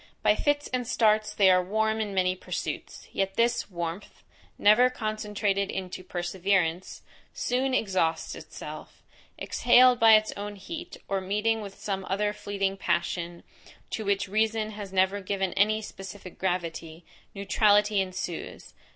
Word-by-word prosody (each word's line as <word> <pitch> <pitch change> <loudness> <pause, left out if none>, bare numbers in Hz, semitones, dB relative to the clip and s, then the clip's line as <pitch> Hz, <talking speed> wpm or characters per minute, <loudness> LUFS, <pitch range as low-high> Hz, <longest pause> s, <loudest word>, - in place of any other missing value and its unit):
By - - +5
fits 290 0 0
and 250 -2 -2
starts 215 -2 +2
they 195 - +4
are 185 0 +4
warm 220 +3 0
in 210 -2 -3
many 185 -1 +1
pursuits; - - -6
yet 195 0 -1
this 235 -1 +1
warmth, 170 +1 -6 0.3
never 230 +5 +6
concentrated 210 -3 -2
into 185 -1 -5
perseverance, 180 -1 -1 0.3
soon 255 +1 0
exhausts 185 -8 0
itself; - - -10 0.3
exhaled 245 0 +5
by 225 -1 +8
its 215 0 +2
own 205 0 -6
heat, 330 - -8
or 195 -1 -1
meeting 210 +4 0
with 200 -2 -8
some 195 -2 -4
other 205 +2 0
fleeting 200 -2 -2
passion, 170 -1 -2 0.5
to 220 - -3
which 200 -1 0
reason 215 +1 0
has 205 -2 -8
never 190 +1 +2
given 190 -1 -2
any 215 +2 +2
specific 190 -2 -10
gravity, 170 -3 -3 0.3
neutrality 205 +1 +3
ensues. 185 -2 -6
200 Hz, 135 wpm, -27 LUFS, 185-215 Hz, 0.5 s, by